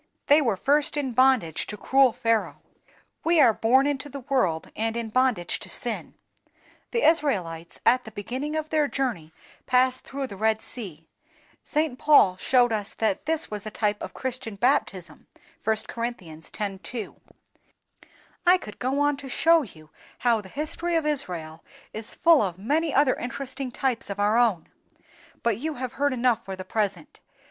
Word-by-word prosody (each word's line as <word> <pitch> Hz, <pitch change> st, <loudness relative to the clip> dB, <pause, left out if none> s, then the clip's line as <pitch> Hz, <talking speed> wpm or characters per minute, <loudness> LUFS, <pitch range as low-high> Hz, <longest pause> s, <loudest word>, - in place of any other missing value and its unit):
They 295 Hz, +2 st, +5 dB
were 230 Hz, -8 st, 0 dB
first 290 Hz, +7 st, +1 dB
in 275 Hz, -3 st, -1 dB
bondage 245 Hz, -, +2 dB
to 210 Hz, -, -5 dB
cruel 265 Hz, +3 st, +4 dB
Pharaoh; 230 Hz, -2 st, -1 dB, 0.6 s
we 335 Hz, 0 st, +3 dB
are 245 Hz, -6 st, +6 dB
born 255 Hz, +6 st, +3 dB
into 290 Hz, 0 st, -2 dB
the 280 Hz, 0 st, -7 dB
world 235 Hz, -, 0 dB
in 225 Hz, +1 st, -2 dB
bondage 250 Hz, -7 st, +1 dB
to -, -, -8 dB
sin. -, -, -2 dB, 0.7 s
The 470 Hz, 0 st, -1 dB
Israelites 185 Hz, -, +1 dB
at 255 Hz, +1 st, +4 dB
the -, -, -7 dB
beginning 255 Hz, +9 st, -4 dB
of 310 Hz, 0 st, -3 dB
their 305 Hz, -2 st, +2 dB
journey 235 Hz, -, -3 dB, 0.4 s
passed 255 Hz, 0 st, +2 dB
through 275 Hz, 0 st, -5 dB
the 225 Hz, -, -8 dB
Red 220 Hz, +2 st, +1 dB
Sea; 175 Hz, -11 st, -6 dB, 0.6 s
St. 300 Hz, -4 st, -1 dB
Paul 285 Hz, -11 st, +5 dB
shows 245 Hz, +4 st, +3 dB
us 210 Hz, -2 st, -3 dB
that 220 Hz, +3 st, -1 dB
this 320 Hz, -5 st, +1 dB
was 210 Hz, 0 st, -5 dB
a -, -, -2 dB
type 210 Hz, -1 st, -1 dB
of -, -, -7 dB
Christian 255 Hz, -4 st, -4 dB
baptism 200 Hz, -6 st, -1 dB, 0.4 s
(1 220 Hz, 0 st, +1 dB
Cor. 230 Hz, 0 st, -3 dB
x. 165 Hz, -10 st, -8 dB, 0.3 s
2). 230 Hz, -5 st, -6 dB, 1.3 s
I 360 Hz, +1 st, +7 dB
could 210 Hz, -, -11 dB
go 270 Hz, +3 st, 0 dB
on 290 Hz, -1 st, +2 dB
to 275 Hz, -1 st, -9 dB
show 330 Hz, +5 st, +4 dB
you 155 Hz, -, -12 dB, 0.3 s
how 235 Hz, -3 st, +2 dB
the 190 Hz, -, -13 dB
history 320 Hz, -, -3 dB
of 325 Hz, -2 st, +1 dB
Israel 175 Hz, -, -3 dB, 0.3 s
is 220 Hz, +1 st, -6 dB
full 330 Hz, -3 st, +5 dB
of 180 Hz, -4 st, -2 dB
many 300 Hz, -, 0 dB
other 275 Hz, -1 st, +4 dB
interesting 265 Hz, +1 st, -5 dB
types 250 Hz, -2 st, -2 dB
of 200 Hz, 0 st, -5 dB
our 205 Hz, +2 st, +2 dB
own, 230 Hz, -8 st, +2 dB, 0.8 s
but 230 Hz, -3 st, +1 dB
you 310 Hz, +3 st, -3 dB
have 255 Hz, -2 st, -5 dB
heard 285 Hz, +1 st, +1 dB
enough 240 Hz, -2 st, +1 dB
for 190 Hz, 0 st, -6 dB
the 185 Hz, 0 st, -8 dB
present. 200 Hz, -7 st, -3 dB
245 Hz, 170 wpm, -25 LUFS, 205-280 Hz, 1.3 s, I